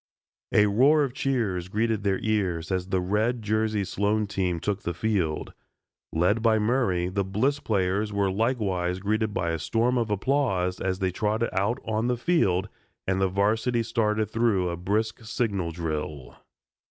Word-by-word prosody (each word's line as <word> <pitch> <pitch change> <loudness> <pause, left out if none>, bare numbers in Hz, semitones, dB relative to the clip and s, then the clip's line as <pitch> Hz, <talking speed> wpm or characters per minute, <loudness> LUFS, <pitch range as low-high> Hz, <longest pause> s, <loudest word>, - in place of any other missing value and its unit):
A 105 - +5
roar 135 +9 +4
of 135 -3 -2
cheers 115 -11 -1
greeted 110 +2 0
their 100 -2 +1
ears 95 -6 0
as 95 -1 -1
the 95 -1 0
red 110 +6 0
jerseyed 110 -2 0
Sloan 105 +3 0
team 95 -4 -1
took 100 +3 -2
the 85 - -3
field. 90 -6 -1 0.6
Led 90 +7 +2
by 110 -1 +4
Murray 105 -6 +1
the 100 +2 -1
Bliss 115 +10 0
players 105 -3 0
were 100 -1 +1
likewise 95 -5 0
greeted 110 +3 0
by 85 -4 -1
a 80 - -2
storm 120 +7 +1
of 115 -2 -1
applause 100 -5 0
as 95 -1 -1
they 95 -1 0
trotted 110 +5 -1
out 100 +6 +1
on 110 +1 0
the 125 -1 0
field 105 - +1 0.4
and 95 0 0
the 95 - +3
varsity 110 +5 +1
started 110 -1 0
through 110 -6 +1
a 85 - -2
brisk 105 +6 -1
signal 105 -5 -1
drill. 75 -4 -4
105 Hz, 165 wpm, -26 LUFS, 95-115 Hz, 0.6 s, A